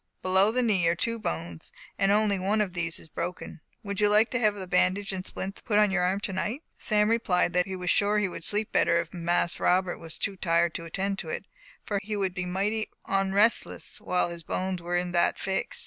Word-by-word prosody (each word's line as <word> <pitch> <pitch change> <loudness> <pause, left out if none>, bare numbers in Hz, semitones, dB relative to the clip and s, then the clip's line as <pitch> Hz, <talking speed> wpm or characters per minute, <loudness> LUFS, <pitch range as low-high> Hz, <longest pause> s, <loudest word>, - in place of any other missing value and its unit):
Below 190 +3 +5
the 250 +2 +1
knee 195 -7 +2
are 170 - +3
two 230 +6 -1
bones, 85 - -5 0.2
and 195 0 +2
only 205 -1 +2
one 200 +4 +1
of 200 -4 0
these 170 -2 0
is - - -11
broken. 180 0 -6 0.2
Would 200 -1 -3
you 210 - +4
like 215 +2 +4
to 250 - 0
have 215 -3 +2
the 190 -2 -6
bandage 185 +3 +1
and 185 -1 -4
splints 195 +1 -6
put 210 -3 0
on 210 -1 +4
your 190 -2 +1
arm 185 +2 +1
tonight?" 210 - -3 0.2
Sam 210 -1 +3
replied 200 -6 +1
that 180 +1 +2
he 190 - -4
was 180 -1 -1
sure 205 +1 +2
he 210 - +2
should 180 -3 -6
sleep 210 +4 -1
better 170 - +3
if 170 - -5
Mas 175 0 0
Robert 180 0 +1
was 165 -1 -6
not - - -7
too 195 -1 -5
tired 170 -1 +2
to 165 - -5
attend 195 +4 -2
to 160 - -5
it, 195 - -4 0.4
for 205 -2 -1
he 210 +1 -4
would 195 -3 -1
be 180 0 -3
"mighty 205 +4 -1 0.2
onrestless" 195 +3 +1
while 180 -1 0
his 170 0 -7
bones 185 +2 -3
were 175 +1 -1
in 175 0 -2
that 175 -1 +2
"fix." 190 0 -2
190 Hz, 230 wpm, -27 LUFS, 175-210 Hz, 0.4 s, Below